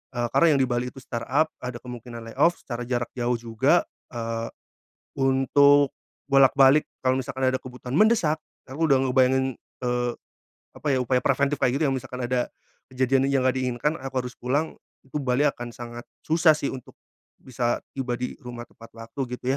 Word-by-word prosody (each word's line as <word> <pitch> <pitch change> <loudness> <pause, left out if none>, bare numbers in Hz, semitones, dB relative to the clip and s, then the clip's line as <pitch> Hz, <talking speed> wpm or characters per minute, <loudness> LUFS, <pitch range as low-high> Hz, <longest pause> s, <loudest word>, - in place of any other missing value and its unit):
eee, 120 0 0
karena 170 - +4
yang 140 - +2
di - - 0
Bali 120 0 -1
itu 135 - -9
startup, 135 +6 0
ada 125 -1 -5
kemungkinan 120 -1 -8
layoff, 170 +7 +3
secara 120 -1 -5
jarak 120 -1 -2
jauh 120 -1 0
juga, 120 +8 +2 0.3
eee, 115 0 -3 0.7
untuk 140 +2 +4 0.3
bolak-balik 135 +1 +5 0.2
kalau 130 0 +3
misalkan 130 +1 -3
ada 130 0 +1
kebutuhan 125 0 -8
mendesak, 180 -9 +3 0.2
aku 155 +5 -1
udah 135 -1 +4
ngebayangin, 130 +1 +2 0.3
eee, 120 0 0 0.6
apa 150 - -6
ya 130 - +2
upaya 125 +1 +2
preventif 140 +1 +2
kayak 130 +3 +2
gitu, 160 - +3
yang 135 - 0
misalkan 125 0 -7
ada 125 -1 0 0.4
kejadian 130 +1 +2
yang 135 -2 +1
nggak 130 0 +2
diinginkan 125 +3 0
aku 130 -1 -3
harus 125 - -6
pulang, 140 +6 -1 0.3
itu 135 - -8
Bali 130 +2 +1
akan 120 -3 -5
sangat 120 0 -8 0.2
susah 160 0 +5
sih 140 - -2
untuk 130 -2 -10 0.5
bisa 120 -2 -1 0.2
tiba 125 -2 -2
di 125 +1 -4
rumah 120 -1 -7
tepat 115 - -16
waktu 115 +4 -9 0.2
gitu 130 +3 -1
130 Hz, 170 wpm, -25 LUFS, 120-135 Hz, 0.7 s, bolak-balik